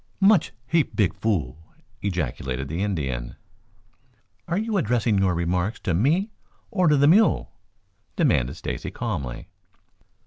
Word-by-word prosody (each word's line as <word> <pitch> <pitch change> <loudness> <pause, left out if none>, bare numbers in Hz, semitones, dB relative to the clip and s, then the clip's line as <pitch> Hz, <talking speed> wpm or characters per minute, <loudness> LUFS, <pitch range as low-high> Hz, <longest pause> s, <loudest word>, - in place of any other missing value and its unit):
"Much 195 -3 +4
heap 155 +3 +1
big 100 -7 +2
fool!" 90 - -1 0.4
ejaculated 70 -8 -3
the 80 +6 -3
Indian. 70 -12 -2 1.1
"Are 170 +1 -1
you 220 +1 -1
addressing 120 - +1
your 95 -2 +2
remarks 90 +5 -1
to 90 - -1
me 160 - +2 0.4
or 180 -2 +2
to 150 -1 +5
the 140 +1 +5
mule?" 205 +7 +4 0.6
demanded 65 +3 +2
Stacy - - -5
calmly. 60 -3 -4
100 Hz, 125 wpm, -24 LUFS, -, 1.1 s, to